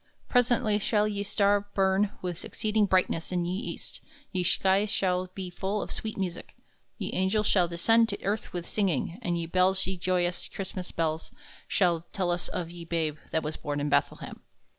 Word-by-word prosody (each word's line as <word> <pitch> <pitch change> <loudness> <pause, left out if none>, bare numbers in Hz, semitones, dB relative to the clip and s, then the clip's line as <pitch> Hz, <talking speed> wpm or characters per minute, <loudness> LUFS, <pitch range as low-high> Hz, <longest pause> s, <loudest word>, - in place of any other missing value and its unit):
Presently 235 -4 +3
shall 210 0 +2
ye 205 -1 -2
star 205 0 +2
burn 195 +1 +3
with 175 -2 -3
exceeding 215 -2 +1
brightness 185 -3 +1
in 175 -1 0
ye 175 - -1
east, 210 - -6 0.3
ye 185 -2 0
sky 190 +3 +3
shall 185 -2 0
be 185 -2 -5
full 195 +4 -2
of - - -4
swete 220 -1 -4
music, 185 -3 -4 0.4
ye - - -4
angels 195 +3 +1
shall 180 -4 +4
descend 225 +7 +3
to 200 - -4
earth 210 +2 -1
with 175 -1 -5
singing, 185 - 0
and 175 -6 0
ye 170 - -2
bells 185 +2 +3
ye 190 0 -3
joyous 180 0 0
Chrystmass 185 -1 -6
bells 160 -1 -1 0.4
shall 170 -3 +2
tell 185 -3 0
us 175 0 -1
of 170 -2 -4
ye 175 -1 -8
babe 165 -2 -1
that 160 - 0
was 155 +1 -3
born 145 0 -3
in 145 +1 -1
Bethlehem. - - 0
185 Hz, 185 wpm, -28 LUFS, 175-205 Hz, 0.4 s, shall